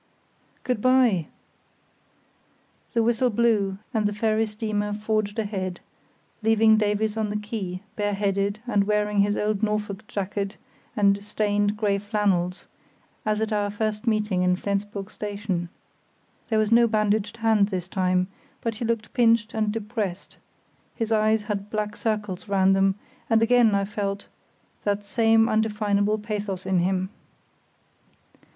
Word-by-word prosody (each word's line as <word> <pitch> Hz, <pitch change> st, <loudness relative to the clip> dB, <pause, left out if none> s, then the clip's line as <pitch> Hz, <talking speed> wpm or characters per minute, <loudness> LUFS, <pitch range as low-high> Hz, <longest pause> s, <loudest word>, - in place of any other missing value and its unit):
"Good 250 Hz, -4 st, -1 dB
bye," 245 Hz, -, +3 dB, 1.7 s
the 230 Hz, -2 st, +3 dB
whistle 235 Hz, +2 st, +2 dB
blew 210 Hz, -4 st, +1 dB, 0.2 s
and 215 Hz, -2 st, +2 dB
the 205 Hz, -, -3 dB
ferry 220 Hz, +1 st, +1 dB
steamer 210 Hz, -1 st, -2 dB
forged 215 Hz, 0 st, -1 dB
ahead, 190 Hz, -4 st, -3 dB, 0.6 s
leaving 220 Hz, 0 st, +5 dB
Davies 215 Hz, 0 st, 0 dB
on 215 Hz, -1 st, 0 dB
the 210 Hz, -, -1 dB
quay, 205 Hz, -3 st, -5 dB
bareheaded 200 Hz, 0 st, 0 dB
and 205 Hz, -5 st, +2 dB
wearing 210 Hz, 0 st, +1 dB
his 205 Hz, +1 st, +3 dB
old 210 Hz, -1 st, 0 dB
Norfolk 210 Hz, -1 st, -2 dB
jacket 200 Hz, 0 st, -3 dB, 0.4 s
and 200 Hz, -1 st, +3 dB
stained 205 Hz, 0 st, 0 dB
grey 205 Hz, -2 st, +1 dB
flannels, 200 Hz, -4 st, 0 dB, 0.6 s
as 215 Hz, 0 st, +1 dB
at 220 Hz, 0 st, -1 dB
our 205 Hz, -1 st, 0 dB
first 215 Hz, +2 st, -3 dB
meeting 215 Hz, -4 st, +1 dB
in 180 Hz, 0 st, +3 dB
Flensburg 200 Hz, 0 st, -3 dB
station. 200 Hz, -4 st, -3 dB, 0.8 s
There 220 Hz, -, +2 dB
was 215 Hz, 0 st, +1 dB
no 235 Hz, 0 st, +6 dB
bandaged 215 Hz, 0 st, 0 dB
hand 220 Hz, -3 st, +3 dB
this 185 Hz, -3 st, -4 dB
time, 185 Hz, -1 st, +1 dB, 0.4 s
but 230 Hz, -2 st, -2 dB
he 235 Hz, -, -3 dB
looked 230 Hz, -1 st, -2 dB
pinched 230 Hz, -3 st, +3 dB
and 215 Hz, -1 st, 0 dB
depressed; 210 Hz, -4 st, -4 dB, 0.6 s
his 225 Hz, -2 st, -2 dB
eyes 215 Hz, 0 st, +3 dB
had 210 Hz, -1 st, -4 dB
black 210 Hz, -1 st, -2 dB
circles 210 Hz, -4 st, -3 dB
round 195 Hz, -1 st, +3 dB
them; 195 Hz, 0 st, +3 dB, 0.3 s
and 225 Hz, 0 st, +4 dB
again 235 Hz, -3 st, +4 dB
I 200 Hz, 0 st, +1 dB
felt 200 Hz, -1 st, -3 dB, 0.6 s
that 205 Hz, 0 st, -1 dB
same 225 Hz, +1 st, +3 dB
indefinable 210 Hz, -1 st, +1 dB
pathos 205 Hz, -3 st, -4 dB
in 190 Hz, -1 st, +2 dB
him. 185 Hz, +1 st, 0 dB
210 Hz, 135 wpm, -25 LUFS, 200-220 Hz, 1.7 s, no